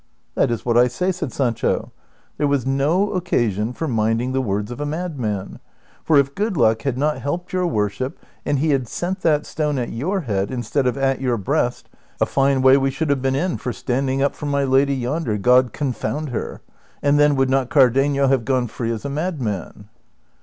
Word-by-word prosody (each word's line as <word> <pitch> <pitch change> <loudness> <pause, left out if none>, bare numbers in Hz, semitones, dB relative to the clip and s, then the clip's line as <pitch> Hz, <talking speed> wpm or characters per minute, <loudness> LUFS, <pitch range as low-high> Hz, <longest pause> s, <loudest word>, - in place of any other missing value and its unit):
" - - -45
That - - +2
is 115 -2 -3
what 120 -1 +2
I 125 +1 +6
say," 180 +10 -1
said 165 -7 -4
Sancho; 120 -4 -1 0.2
" - - -37
there 145 - +2
was 140 -3 0
no 145 +9 +1
occasion 120 - 0
for 160 +6 -4
minding 115 +1 0
the 135 0 0
words 105 -2 -2
of 120 - -6
a - - -1
madman; 145 - -4 0.4
for 155 - +3
if 140 0 +2
good 205 0 -1
luck 110 -3 +3
had 130 -1 -2
not 150 +2 0
helped 175 +6 -4
your 180 -1 +1
worship, 110 0 -2 0.3
and 145 - 0
he 155 +3 +1
had 130 -3 0
sent 185 - -3
that 150 -3 +2
stone 150 -2 -2
at 120 -2 -2
your 185 - -2
head 100 - -1
instead 130 +2 -1
of 125 - 0
at 135 -1 0
your 125 -3 0
breast, 100 - -1 0.3
a - - +3
fine 135 -1 +1
way 130 +1 +7
we 135 0 +1
should 145 +3 -1
have 140 -2 0
been 135 0 0
in 175 +5 -1
for 125 - -4
standing 135 +3 -1
up 140 - +1
for 150 - -6
my 140 -1 +1
lady 135 +1 +3
yondfer, 125 -4 -2
God 125 +3 +4
confound 145 +2 -3
her! 120 - -5 0.4
And 145 0 +3
then, 145 -1 +4
would 135 -1 +1
not 135 -2 +1
Cardenio 135 +1 +3
have 135 -3 +2
gone 130 0 +1
free 115 0 -4
as 110 -2 -5
a - - -2
madman 130 - -4
135 Hz, 210 wpm, -21 LUFS, 120-145 Hz, 0.4 s, way